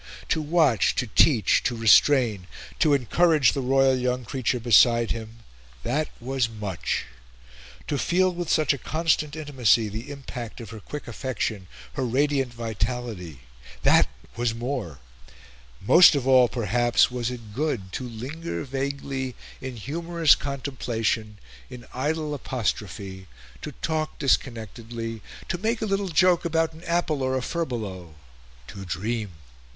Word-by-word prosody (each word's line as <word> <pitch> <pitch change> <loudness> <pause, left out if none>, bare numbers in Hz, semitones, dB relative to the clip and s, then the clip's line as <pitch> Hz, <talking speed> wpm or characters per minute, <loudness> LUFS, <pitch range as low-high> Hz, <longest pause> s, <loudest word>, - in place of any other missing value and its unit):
To 160 - +1
watch, 150 - +2
to - - 0
teach, 110 - +4
to 125 - -1
restrain, 115 -3 +4 0.3
to 150 -3 +4
encourage 150 +2 +3
the 140 - -2
royal 135 +1 +3
young 125 0 -1
creature 125 +1 -1
beside 115 0 +5
him 115 0 -7 0.4
that 150 +6 -1
was 130 -1 -1
much; 105 -7 -3 0.8
to 145 - -2
feel 185 +1 +2
with 175 -2 -4
such 155 -3 +3
a 140 - -6
constant 155 0 0
intimacy 130 -8 +2
the 110 +7 -7
impact 130 -5 -7
of 115 -3 -9
her 110 - -8
quick 150 +7 -8
affection, 115 -5 -3 0.3
her 135 - -2
radiant 135 +1 +1
vitality 115 - -4 0.4
that - - +5 0.3
was 120 -1 -1
more; 120 - -4 0.8
most 170 - +7
of 135 -3 -1
all, 130 -2 +6
perhaps, 120 +1 +2
was 125 -1 -2
it 115 -4 -8
good 125 -9 -2
to - - -4
linger 140 +9 -5
vaguely 135 -1 -4 0.3
in 130 -1 -6
humorous 165 - +2
contemplation, 120 -6 -2 0.3
in 125 -1 -10
idle 150 +3 -2
apostrophe, 100 -8 -4 0.3
to 150 - -6
talk 155 -1 -2
disconnectedly, 115 -3 -2 0.3
to 175 - -3
make 225 +4 0
a 220 - -2
little 195 -1 -1
joke 180 +1 +4
about 165 -1 0
an 160 +2 -14
apple 170 -4 0
or 130 0 0
a - - -2
furbelow, 105 - -4 0.5
to 95 +7 -9
dream. 105 +2 -3
125 Hz, 135 wpm, -25 LUFS, 115-150 Hz, 0.8 s, most